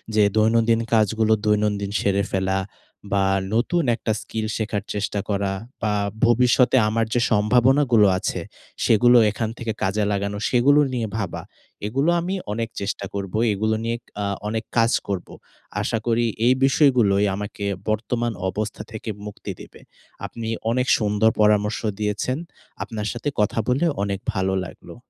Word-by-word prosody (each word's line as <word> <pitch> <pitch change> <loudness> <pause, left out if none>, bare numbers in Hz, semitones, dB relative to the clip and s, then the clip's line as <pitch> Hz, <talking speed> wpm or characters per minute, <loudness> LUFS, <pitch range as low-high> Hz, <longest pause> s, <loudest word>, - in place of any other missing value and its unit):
যে 110 - +5
দৈনন্দিন 115 +1 +3
কাজগুলো 110 0 +3
দৈনন্দিন 105 -1 +1
সেরে 100 0 +1
ফেলা, 95 0 0 0.5
বা 100 -1 +2 0.3
নতুন 160 +9 +1
একটা 110 - -3
স্কিল 110 -1 -4
শেখার 105 -2 -2
চেষ্টা 105 0 -2
করা, 100 -1 0 0.3
বা 105 -1 0 0.3
ভবিষ্যতে 125 +2 +4
আমার 115 +1 +1
যে 120 - +2
সম্ভাবনাগুলো 120 +1 +4
আছে - - -2 0.4
সেগুলো 120 +2 +5
এখান 110 +1 -3
থেকে 115 -2 -3
কাজে 100 +3 +1
লাগানো, 100 0 -2
সেগুলো 135 +4 +4
নিয়ে 115 -3 -1
ভাবা। 100 -6 -3 0.5
এগুলো 135 +9 +1
আমি 185 +3 -2 0.2
অনেক 115 +1 -3
চেষ্টা 100 0 -3
করবো, 100 +1 -3 0.2
এগুলো 110 +2 0
নিয়ে 115 +1 -1 0.3
আ - - -1 0.2
অনেক 110 +1 -2
কাজ 115 0 +4 0.2
করবো। 95 -3 -4 0.5
আশা 115 - -1
করি 120 0 +2 0.2
এই 125 - +6
বিষয়গুলোই 125 -8 +4
আমাকে 105 0 -5 0.2
বর্তমান 115 +2 -1 0.2
অবস্থা 105 +2 -4
থেকে 110 0 -6 0.2
মুক্তি 105 -1 -7
দেবে। - - -13 0.4
আপনি 115 -1 -6 0.2
অনেক 125 +1 0
সুন্দর 105 0 +2
পরামর্শ 105 +1 +3 0.2
দিয়েছেন। 105 +5 -1 0.5
আপনার 105 -1 -5
সাথে 120 +5 -3
কথা 105 +2 +1
বলে 135 +7 +2 0.2
অনেক 100 -1 -2
ভালো 95 -1 0
লাগলো। - - -12
110 Hz, 145 wpm, -23 LUFS, 105-120 Hz, 0.5 s, এই